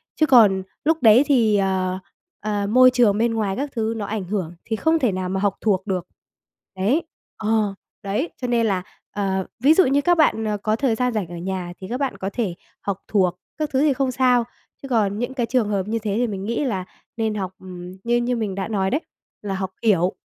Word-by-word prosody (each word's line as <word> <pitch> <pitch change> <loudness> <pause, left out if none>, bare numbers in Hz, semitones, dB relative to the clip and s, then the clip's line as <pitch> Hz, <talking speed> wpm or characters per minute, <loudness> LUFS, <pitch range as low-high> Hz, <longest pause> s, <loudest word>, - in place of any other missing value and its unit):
Chứ 310 - +3
còn 215 -9 +5 0.2
lúc 320 +1 +3
đấy 225 +4 +7
thì, 230 -7 +4
ờ, 190 -1 0 0.4
ờ, 205 -1 -2
môi 255 +3 +7
trường 235 -5 +3
bên 230 +1 +1
ngoài 210 -4 -1
các 285 +6 -3
thứ 225 -1 0
nó 210 - -3
ảnh 210 -1 -3
hưởng 180 -3 -3
thì 220 - -1
không 320 +8 +2
thể 245 -8 +2
nào 185 -1 -3
mà 190 +1 -1
học 200 0 +1
thuộc 195 -2 +1
được. 185 -3 -2 0.7
Đấy, 225 - +1 0.3
ờ, 215 -2 +1 0.3
đấy, 205 - -1
cho 250 - -1
nên 235 -1 +2
là, 190 -4 0 0.3
ờ, 190 -2 -1
ví 275 +6 +6
dụ 375 - +5
như 280 +2 +3
các 350 +4 +3
bạn, 225 -8 +3
ờ, 210 -1 -1
có 215 +2 0
thời 235 -1 +1
gian 250 +1 0
rảnh 210 -5 -1
ở 175 - -8
nhà 180 0 -4
thì 185 - -8
các 250 +2 -3
bạn 275 -2 -2
có 190 - -3
thể 210 -8 -2 0.3
học 200 -1 -3
thuộc 180 -4 +1 0.2
các 305 -1 -1
thứ 265 - +3
thì 295 -1 +4
không 265 0 0
sao, 250 -1 +3 0.4
chứ 275 - -7
còn 210 -5 +1
những 245 +2 -2
cái 250 -3 -1
trường 230 -2 +1
hợp 200 -2 -1
như 225 +1 -1
thế 210 -2 -2
thì 245 +1 +1
mình 195 -3 -5
nghĩ 235 +6 -1
là 190 -8 -2 0.3
nên 220 -2 0
học, 190 -3 -3
ừm, 180 -1 -9
như 240 +1 +2
như 240 +1 0
mình 215 -5 -2
đã 190 -1 -3
nói 195 -3 0
đấy, 290 +8 0 0.4
là 200 -2 -3
học 190 -1 -3
hiểu 190 -5 +3
215 Hz, 235 wpm, -22 LUFS, 190-245 Hz, 0.7 s, đấy